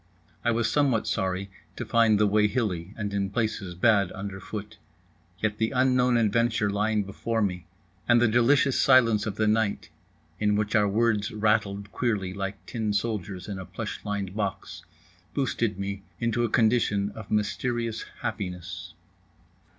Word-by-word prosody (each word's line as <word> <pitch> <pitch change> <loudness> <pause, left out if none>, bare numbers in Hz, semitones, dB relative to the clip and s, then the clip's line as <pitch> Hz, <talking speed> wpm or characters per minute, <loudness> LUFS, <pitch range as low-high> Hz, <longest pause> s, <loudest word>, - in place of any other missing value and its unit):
I 120 - +2
was 115 -1 +1
somewhat 135 -4 +2
sorry 95 +1 -2 0.2
to - - -5
find 115 -3 +4
the 105 - +5
way 105 +1 +3
hilly, 100 -6 -2
and 105 -2 -3
in 100 -1 0
places 105 -4 -2
bad 100 -1 +3
underfoot; 100 +1 -7 0.6
yet 105 +1 -2
the 110 0 +2
unknown 125 -1 +3
adventure 115 -1 +2
lying 105 +1 +1
before 115 +4 -3
me, 90 -3 -3 0.4
and 120 0 +6
the 120 - +4
delicious 130 +4 +3
silence 115 -5 +5
of 105 - -3
the 110 - +1
night 110 -1 +1 0.5
(in 105 -1 +2
which 105 0 -1
our 105 -2 +4
words 105 0 +1
rattled 105 -2 0
queerly 105 -7 -1
like 95 -2 -5
tin 110 -1 -2
soldiers 100 -3 -2
in 100 -2 -5
a 95 - -7
plush - - -6
lined 100 -2 -3
box) 105 -1 -4 0.5
boosted 120 -6 0
me 100 0 -4 0.2
into 120 0 0
a 120 - +1
condition 110 -3 +2
of 110 0 -10
mysterious 115 +2 -1 0.2
happiness. 90 -4 -5
105 Hz, 150 wpm, -27 LUFS, 100-115 Hz, 0.6 s, and